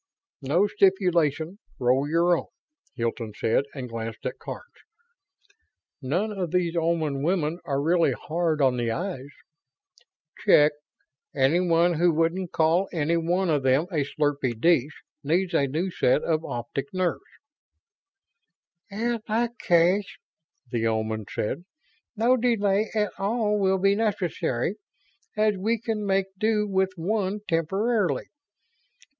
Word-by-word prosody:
"No 155 +9 +2
stipulation; 180 -4 +1 0.2
roll 130 +3 +2
your 170 +2 +3
own," - - -4 0.5
Hilton 115 -3 -3
said, 115 +5 +1
and 130 -3 -5
glanced 115 -1 -6
at - - -4
Karns. - - -7 1.4
"None 175 +11 -1
of 190 -4 -3
these 175 0 0
Oman 160 -4 0
women 165 0 0
are 140 -1 -1
really 165 +3 +2
hard 160 -2 -1
on 130 -2 +3
the 120 -1 -1
eyes." 140 - -4 1.1
"Check. 150 +1 +5 0.6
Anybody 170 +4 +3
who 175 0 +4
wouldn't 165 +3 0
call 165 +4 +2
any 165 -1 0
one 175 +2 +1
of 145 -3 +1
'em 130 +3 +3
a 150 -5 +1
slurpy 140 -5 -1
dish 150 -1 +2 0.2
needs 175 +5 0
a 140 - +2
new 165 +8 -2
set 145 -2 +2
of 160 -1 0
optic 120 - -5
nerves." 185 -2 0 1.7
"In 230 +3 -2
that 235 +3 -1
case," 180 +4 +2 0.5
the 115 -2 0
Omans 110 -1 -2
said, 140 +10 -3 0.5
"no 235 +4 +4
delay 215 -4 +1
at 210 -2 +1
all 210 +1 0
will 190 -1 +2
be 195 +1 +3
necessary, 195 - -1 0.6
as 215 -1 +2
we 225 +4 0
can 220 -2 -3
make 195 0 +2
do 215 -1 +1
with 190 -1 +1
one 200 +3 -1
temporarily. 195 +6 0
170 Hz, 125 wpm, -25 LUFS, 145-195 Hz, 1.7 s, Check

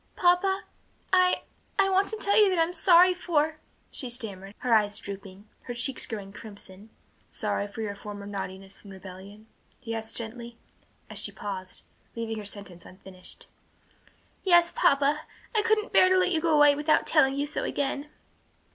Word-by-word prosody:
"Papa, 380 +2 +2 0.5
I 365 0 +4 0.3
I 395 -1 +4
wanted 395 +3 +1
to - - 0
tell 405 - +3
you 420 -2 +6
that 370 - 0
I'm 330 +1 +2
sorry 360 +1 +6
for 315 -4 0 0.2
" - - -37
she 255 - -4
stammered, 205 -5 -5
her 250 -2 0
eyes 210 -2 +3
drooping, 200 0 -9 0.2
her 245 - -5
cheeks 255 +2 -1
growing 200 -3 -6
crimson. 200 -1 -12 0.4
"Sorry 200 - -2
for 220 +2 -6
your 205 -2 -3
former 205 0 -8
naughtiness 195 -1 -6
and 200 - -12
rebellion?" 190 +3 -11 0.3
he 230 -3 -6
asked 225 0 -2
gently, 235 +1 -6 0.5
as - - -2
she - - -1
paused, 190 -2 -7 0.3
leaving 225 -1 -4
her 210 - -8
sentence 200 -4 -7
unfinished. 185 -1 -7 1.0
"Yes, 345 -2 +5
papa, 285 +2 +2 0.3
I 430 - +4
couldn't 435 -1 +1
bear 370 - +6
to 375 - +4
let 370 0 +2
you 325 -3 +2
go 325 -1 +2
away 295 -1 +7
without 300 +2 +2
telling 270 -4 +4
you 285 +1 0
so 295 - -3
again." 285 +1 -2
240 Hz, 170 wpm, -27 LUFS, 200-340 Hz, 1.0 s, away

